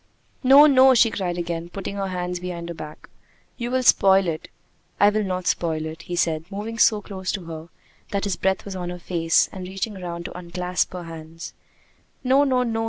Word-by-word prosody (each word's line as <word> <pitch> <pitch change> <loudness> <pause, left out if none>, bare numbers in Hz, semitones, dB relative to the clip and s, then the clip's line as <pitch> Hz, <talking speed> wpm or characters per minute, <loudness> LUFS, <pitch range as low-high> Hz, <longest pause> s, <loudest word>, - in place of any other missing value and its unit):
"No! 275 +3 +8
No!" 265 -2 +6
she 230 -1 +5
cried 180 -4 -3
again, 170 -1 -4
putting 195 +2 -6
her 195 -1 -2
hands 180 -1 -3
behind 175 -1 -6
her - - -4
back. 155 -2 -10 0.5
"You 240 -1 -3
will 255 +1 0
spoil 195 -4 +5
it!" 160 0 -3 0.5
"I 205 - +6
will 215 0 0
not 185 -2 -3
spoil 160 -2 0
it," 160 0 -7
he 175 - -5
said, 160 -2 0
moving 220 +3 -5
so 210 -3 +4
close 190 -2 -4
to 190 -4 -5
her 165 0 -8 0.4
that 200 -1 -2
his 200 -3 -1
breath 190 +2 -1
was 200 -1 -6
on 180 -1 -4
her 180 - -5
face, 170 -2 +2
and 185 -1 -7
reaching 195 +3 -4
round 170 -3 -6
to - - -7
unclasp 180 +1 -2
her 180 -1 -6
hands. 165 0 -9 0.7
"No! 265 +2 +4
No! 255 -3 +2
No!" 225 -2 -2
185 Hz, 205 wpm, -23 LUFS, 170-210 Hz, 0.7 s, No